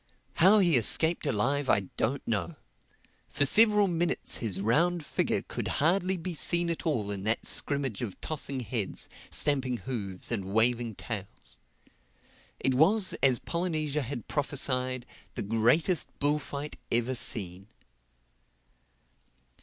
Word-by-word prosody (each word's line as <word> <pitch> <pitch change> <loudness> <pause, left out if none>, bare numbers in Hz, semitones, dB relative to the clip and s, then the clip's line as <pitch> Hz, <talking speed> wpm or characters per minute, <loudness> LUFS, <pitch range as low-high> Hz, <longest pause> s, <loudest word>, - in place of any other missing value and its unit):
How 190 +6 +6
he 175 -8 +4
escaped 160 +8 +3
alive 135 +4 0
I 100 - +4
don't 135 +5 -2
know. 90 -8 -2 0.7
For 145 - +1
several 210 +4 +5
minutes 175 -1 0
his 100 -5 -3
round 160 - +1
figure - - -1
could - - -5
hardly 185 +4 +1
be 175 +1 -5
seen 170 +2 +2
at 165 - -5
all 110 -10 -1
in 100 -1 -4
that 110 +1 -1
scrimmage 140 -7 0
of 110 -6 -6
tossing 140 -4 -3
heads, 115 -5 -3 0.2
stamping 130 -4 0
hoofs 105 -8 -5
and 100 -5 -2
waving 115 +2 +1
tails.—It 110 +5 -9
was, 185 +9 +3
as 130 -3 +4
Polynesia 155 -3 -2
had 125 -4 -6
prophesied, 130 -4 -1 0.3
the - - -3
greatest 120 - +2
bullfight 145 0 -2
ever 120 +2 +1
seen. 95 -6 0
135 Hz, 120 wpm, -28 LUFS, 115-160 Hz, 0.7 s, How